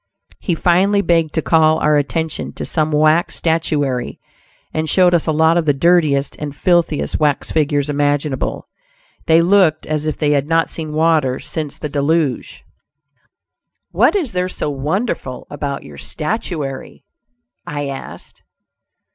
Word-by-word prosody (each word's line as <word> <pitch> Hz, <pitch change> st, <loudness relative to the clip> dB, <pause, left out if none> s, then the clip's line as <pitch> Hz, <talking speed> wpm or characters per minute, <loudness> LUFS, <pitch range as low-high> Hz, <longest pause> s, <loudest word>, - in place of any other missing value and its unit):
He 175 Hz, -, -1 dB
finally 190 Hz, +5 st, +2 dB
begged 165 Hz, -4 st, +1 dB
to 160 Hz, -, 0 dB
call 160 Hz, -1 st, +3 dB
our 150 Hz, -1 st, +2 dB
attention 160 Hz, +3 st, -2 dB
to -, -, -6 dB
some 155 Hz, -1 st, 0 dB
wax 155 Hz, +3 st, +2 dB
statuary, 145 Hz, -6 st, -1 dB, 0.5 s
and 155 Hz, 0 st, -2 dB
showed 180 Hz, +2 st, +4 dB
us 170 Hz, -1 st, +1 dB
a -, -, +2 dB
lot 160 Hz, +2 st, +3 dB
of 165 Hz, -2 st, 0 dB
the 145 Hz, -, +3 dB
dirtiest 150 Hz, -3 st, +2 dB
and 145 Hz, -1 st, -6 dB
filthiest 170 Hz, -1 st, +1 dB
wax 150 Hz, -2 st, 0 dB
figures 145 Hz, -2 st, +1 dB
imaginable. 145 Hz, -1 st, -1 dB, 0.6 s
They 165 Hz, +1 st, +5 dB
looked 175 Hz, -4 st, +3 dB
as 155 Hz, 0 st, -2 dB
if 155 Hz, -, -2 dB
they 150 Hz, -2 st, +1 dB
had 145 Hz, -1 st, +1 dB
not 165 Hz, 0 st, +1 dB
seen 155 Hz, -2 st, -5 dB
water 155 Hz, -5 st, +2 dB
since 150 Hz, -2 st, -5 dB
the 155 Hz, -, -4 dB
Deluge. 145 Hz, 0 st, -1 dB, 1.3 s
"What -, -, +3 dB
is 320 Hz, -, -1 dB
there 180 Hz, 0 st, -1 dB
so 150 Hz, -, -3 dB
wonderful 145 Hz, -, -3 dB
about 140 Hz, -1 st, -4 dB
your 70 Hz, -1 st, -12 dB
statuary?" 155 Hz, -6 st, -5 dB, 0.6 s
I 145 Hz, -1 st, -3 dB
asked. 135 Hz, -, -9 dB
155 Hz, 145 wpm, -18 LUFS, 145-165 Hz, 1.3 s, They